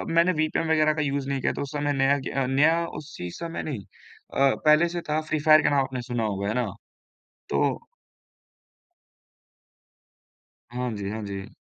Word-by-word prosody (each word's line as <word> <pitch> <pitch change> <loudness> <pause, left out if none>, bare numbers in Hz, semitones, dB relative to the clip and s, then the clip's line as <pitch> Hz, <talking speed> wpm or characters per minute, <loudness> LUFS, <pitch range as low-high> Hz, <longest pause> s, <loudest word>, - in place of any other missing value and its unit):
मैंने 170 +2 +5
विपिएन 155 +1 0
वगैरह 155 -1 +4
का 150 - -2
यूज़ 140 -1 -1
नहीं 135 -1 -1
किया - - +1
तो - - -5
उस 140 - -5
समय 145 0 0
नया 135 +1 +3
क्य 135 0 -2
नया 165 +4 +4
उसी 135 - -8
समय 170 0 -5
नहीं 140 -9 -4 0.5
अ, 135 0 +3
पहले 155 +3 +6
से 175 0 -4
था 155 +1 +2
फ्री 155 - 0
फायर 155 +1 +6
का - - +3
नाम 140 -1 +3
आपने 130 -1 -4
सुना 120 -2 -3
होगा, 100 -2 -2
है 105 - 0
ना? 125 -1 0 0.9
तो - - +1 2.9
हाँ 125 0 -3
जी, 100 -1 -4
हाँ 110 0 -4
जी। 100 -1 -7
140 Hz, 175 wpm, -26 LUFS, 125-155 Hz, 2.9 s, पहले